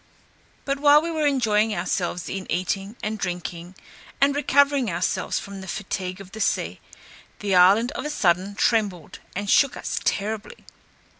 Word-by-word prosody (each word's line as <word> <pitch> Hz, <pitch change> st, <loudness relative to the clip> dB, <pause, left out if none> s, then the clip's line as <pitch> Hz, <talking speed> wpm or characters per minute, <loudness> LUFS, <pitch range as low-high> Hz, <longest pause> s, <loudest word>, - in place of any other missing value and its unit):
But 275 Hz, 0 st, -1 dB
while 290 Hz, +1 st, +7 dB
we 335 Hz, +2 st, -3 dB
were 310 Hz, -2 st, +1 dB
enjoying 220 Hz, -6 st, +2 dB
ourselves 175 Hz, 0 st, -2 dB
in 190 Hz, -1 st, -5 dB
eating 195 Hz, +4 st, -2 dB
and 215 Hz, 0 st, -3 dB
drinking, 175 Hz, -1 st, -5 dB, 0.4 s
and 280 Hz, 0 st, +3 dB
recovering 285 Hz, -3 st, +3 dB
ourselves 175 Hz, +1 st, -1 dB
from 200 Hz, -1 st, -7 dB
the 190 Hz, -, -9 dB
fatigue 185 Hz, -1 st, -4 dB
of 195 Hz, -1 st, -11 dB
the 220 Hz, -, -7 dB
sea, -, -, -1 dB, 0.6 s
the 200 Hz, -2 st, -2 dB
island 195 Hz, +7 st, +5 dB
on -, -, -4 dB
a -, -, -4 dB
sudden 190 Hz, -, +1 dB
trembled, 205 Hz, -8 st, 0 dB, 0.2 s
and 200 Hz, +2 st, -3 dB
shook 275 Hz, +6 st, +4 dB
us -, -, -3 dB
terribly. 215 Hz, -, -3 dB
205 Hz, 155 wpm, -24 LUFS, 185-265 Hz, 0.6 s, while